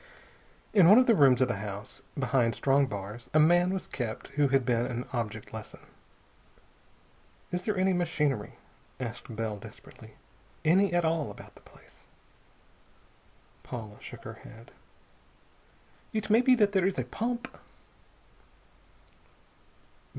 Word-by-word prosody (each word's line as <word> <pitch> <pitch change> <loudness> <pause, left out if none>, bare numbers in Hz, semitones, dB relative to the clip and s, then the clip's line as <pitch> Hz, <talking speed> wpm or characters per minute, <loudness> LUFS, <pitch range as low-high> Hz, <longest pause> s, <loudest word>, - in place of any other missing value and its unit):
In 185 -5 +7
one 210 - +9
of 255 - +6
the 235 - +5
rooms 135 - +5
of 130 - +4
the 125 - -2
house, 100 +1 -7 0.2
behind 125 -4 +1
strong 140 0 +2
bars, 105 +2 -7
a - - +7
man 175 +3 +4
was 190 -1 -3
kept 115 -4 -5
who 145 0 +2
had 135 -2 +2
been 120 -1 +1
an 125 -1 -4
object 110 -3 -4
lesson.... 110 -1 -9 1.7
"Is 180 - -2
there 205 +1 -2
any 190 0 +2
machinery?" 150 - -1 0.4
asked 120 -1 -6
Bell 110 -2 -3
desperately. 100 - -14 0.5
"Any 185 +4 +4
at 175 -1 +1
all 160 -2 0
about - - -12
the - - -19
place?" - - -19 1.5
Paula 110 -4 -8
shook - - -10
her - - -9
head. 115 +2 -14 1.4
"It 215 -1 -2
may 225 +3 +6
be 255 0 +5
that 210 -4 +3
there 190 -2 +2
is 195 - -2
a 130 - 0
pump." 240 - -4
140 Hz, 135 wpm, -29 LUFS, 115-185 Hz, 1.7 s, one